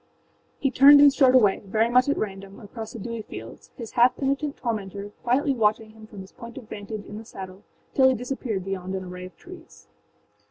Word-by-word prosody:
â - - -41 0.5
He 275 - 0
turned 280 +3 +8
and 285 -1 +7
strode 260 -2 +4
away, 210 -6 +4
very 215 +3 +1
much 250 +3 +3
at 285 - +1
random, 195 -1 -6
across 220 +1 -9
the - - -7
dewy 230 +1 -5
fields, - - -11
his 230 -4 -8
half 245 +1 +4
penitent 280 +1 -2
tormentor 205 -3 -4
quietly 270 +4 +1
watching 220 -2 0
him 220 0 -15
from 205 -3 -10
his 190 - -13
point 235 +1 -11
of 245 -5 -10
vantage 205 0 -7
in 210 +1 -8
the - - -10
saddle 190 -3 -10 0.3
till 260 -1 +5
he 260 - +1
disappeared 240 -5 -4
beyond 190 -1 -4
an 190 - -4
array 180 0 -8
of 185 - -19
trees. 350 -2 -14
225 Hz, 210 wpm, -25 LUFS, 200-260 Hz, 0.5 s, turned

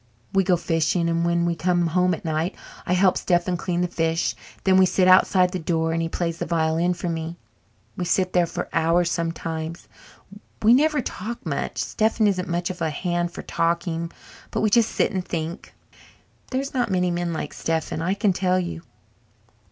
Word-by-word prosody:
We 195 0 +4
go 180 -1 +3
fishing, 165 0 0
and 170 0 +1
when 170 0 +1
we 170 - +1
come 175 +1 +1
home 180 +2 +2
at 165 - -13
night 160 +2 -1 0.3
I 180 - +2
help 185 0 +4
Stephen 175 0 +1
clean 175 0 -2
the 180 - +1
fish 165 -1 0
and - - -20
then 190 -1 +4
we 190 -1 +6
sit 185 0 +2
outside 185 0 +5
the 185 - -3
door 165 0 0
and 165 - 0
he 165 - -2
plays 165 0 -2
the - - -3
violin 165 +1 +1
for 175 - -4
me. 165 0 -4 0.6
We 180 - -3
sit 185 +1 +1
there 175 -1 +3
for - - -4
hours 165 +1 +2
sometimes. 165 -1 -4 0.8
We 225 +2 +7
never 300 +2 +3
talk 230 0 -6
much 140 -4 -3
Stephen 220 0 +1
isn't 190 -2 0
much 175 +1 -1
of 180 - -10
a 160 - +1
hand 175 +2 -1
for - - -8
talking 170 0 -1 0.4
but - - -2
we 215 - +2
just 230 -1 +4
sit - - +1
and 190 -3 -2
think. 165 +1 -5 0.8
There's 270 +2 -2
not 245 -3 0
many 180 -2 +1
men 175 0 -1
like 160 - -4
Stephen, 160 -1 -2
I 185 +4 0
can 200 -1 +2
tell 185 0 +1
you." 80 - -4
175 Hz, 195 wpm, -24 LUFS, 165-185 Hz, 0.8 s, We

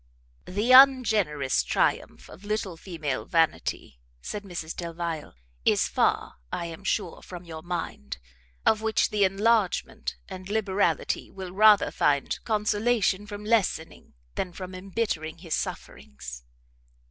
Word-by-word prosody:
"The 210 +7 0
ungenerous 215 - +5
triumph - - -1
of 190 - -14
little 205 -3 -2
female 160 -6 -4
vanity," 165 - 0 0.2
said 205 - -5
Mrs 175 -5 -6
Delvile, 170 - -5 0.3
"is - - +3
far, - - 0
I 170 - -3
am 165 +3 -8
sure, 190 -2 -2
from 180 -1 -9
your 160 -2 -8
mind, 165 - -5 0.5
of 220 -1 +3
which 220 0 +1
the 210 -1 +2
enlargement 215 +2 +1
and 185 0 -9
liberality 205 -2 0
will 190 -2 -8
rather 210 +2 +5
find 140 -1 +1
consolation 210 -1 +1
from 205 0 -7
lessening 210 - -1 0.2
than 180 -2 -3
from 185 +1 -7
embittering 185 -4 -3
his 165 -2 -6
sufferings. 65 -2 -6
185 Hz, 125 wpm, -27 LUFS, 160-210 Hz, 0.5 s, ungenerous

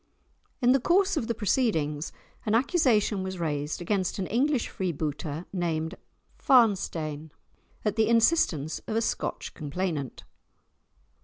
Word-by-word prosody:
In 245 - +6
the 270 - +4
course 385 +7 +3
of 245 -8 -1
the 235 - -1
proceedings 170 - 0 0.3
an 215 0 +1
accusation 235 - +2
was 190 0 -4
raised 150 -2 -2
against 190 0 -1
an 190 - -2
English 260 +5 +1
freebooter 155 -2 -3
named 165 -2 -1 0.5
Farnstein, 170 - +2 0.6
at 210 +1 0
the 220 - +3
instance 225 - +2
of 215 - -2
a 225 - +2
Scotch - - -3
complainant. 155 -3 -4
190 Hz, 125 wpm, -27 LUFS, 155-235 Hz, 0.6 s, In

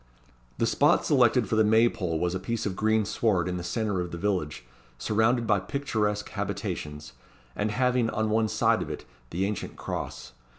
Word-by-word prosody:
The - - +1
spot - - +3
selected - - +4
for - - 0
the 110 - +5
May 110 +2 +5
pole 90 -8 -2
was 90 +1 0
a 95 - -2
piece 115 +4 -3
of 100 -3 -2
green 110 +1 +2
sward 95 -5 +1
in 90 0 -2
the 90 - -5
centre 105 -1 -1
of 90 - -4
the 85 - -6
village, 85 -9 -2 0.3
surrounded 115 +3 +1
by 105 -3 +3
picturesque 105 -2 -2
habitations, 75 0 -4 0.4
and 105 +1 -1
having, 125 +1 +1
on 110 0 -1
one 110 0 +2
side - - +2
of - - -4
it, - - -6 0.2
the 90 +3 -1
ancient 105 +1 -4
Cross. 65 - -5
105 Hz, 185 wpm, -27 LUFS, 90-110 Hz, 0.4 s, the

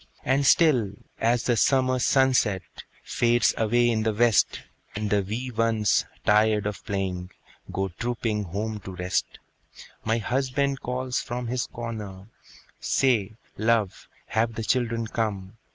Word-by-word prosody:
And 135 +2 +2
still, 125 - +4 0.3
as 120 +1 +2
the 120 - +2
summer 130 +2 +2
sunset 125 -8 +2 0.4
Fades 120 -1 +2
away 120 +2 +2
in 110 -1 0
the 110 -1 0
west, 115 -1 +3 0.3
And 105 0 -3
the 105 -1 +3
wee 115 +7 -4
ones, 115 -2 +2 0.2
tired 105 0 +3
of 105 -1 -4
playing, 95 -2 -3 0.4
Go 95 0 -2
trooping 110 +1 -2
home 105 +4 -4
to 95 -1 -9
rest, 90 +1 -2 0.7
My 115 +1 +1
husband 135 +4 -1
calls 125 0 -2
from 120 +1 -4
his 125 +1 -2
corner, 105 -5 -7 0.5
"Say, 110 -6 +1 0.3
love, 110 -3 0 0.2
have 115 0 0
the 115 - -3
children 115 0 0
come?" 105 -3 -3
115 Hz, 135 wpm, -25 LUFS, 105-125 Hz, 0.7 s, still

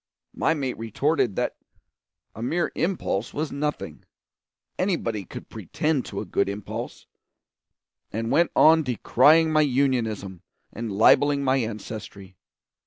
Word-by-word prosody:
My 160 - +1
mate 135 -6 -3
retorted 115 0 0
that - - -2 0.8
a 110 - -9
mere 170 +9 -1
impulse 165 - -2
was 155 +1 -2
nothing 150 +1 -4 0.8
anybody 120 - -1
could - - -9
pretend 150 -4 -2
to 100 - -5
a - - -6
good 100 +1 0
impulse; 100 +1 -6 1.1
and 115 +2 -3
went 170 +5 +3
on 160 +1 +6
decrying 150 +4 +3
my 155 - +5
Unionism 120 - 0 0.3
and 115 0 -5
libelling 140 +7 +4
my 130 0 +2
ancestry. 105 -4 -6
130 Hz, 120 wpm, -25 LUFS, 110-150 Hz, 1.1 s, on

